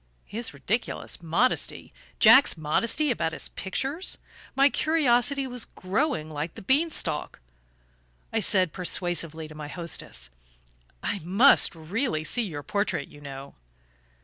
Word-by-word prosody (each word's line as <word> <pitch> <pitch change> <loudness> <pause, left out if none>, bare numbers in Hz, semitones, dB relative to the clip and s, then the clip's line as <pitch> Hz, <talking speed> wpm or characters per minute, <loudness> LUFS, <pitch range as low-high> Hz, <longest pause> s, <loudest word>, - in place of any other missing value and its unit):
His 225 +2 -3
ridiculous 225 -4 -3
modesty 175 +10 0 0.3
Jack's 265 -9 +7
modesty 230 - +1
about 165 -8 -1
his - - -4
pictures? 270 - -3 0.4
My 275 +1 +6
curiosity 280 -2 +2
was 250 -2 -4
growing 205 - -1
like 155 +1 -5
the - - -10
bean 285 - +2
stalk. 150 - -1 0.9
I - - +2
said 185 -4 +2
persuasively 170 -3 -1
to 155 - -12
my 150 -1 -7
hostess: 165 - -6 0.7
"I 200 - -1
must 200 - +4
really 165 - -2
see 240 +10 -1
your 160 -10 -5
portrait, 200 -3 -2
you 145 - -15
know." 140 -1 -9
190 Hz, 125 wpm, -26 LUFS, 160-255 Hz, 0.9 s, Jack's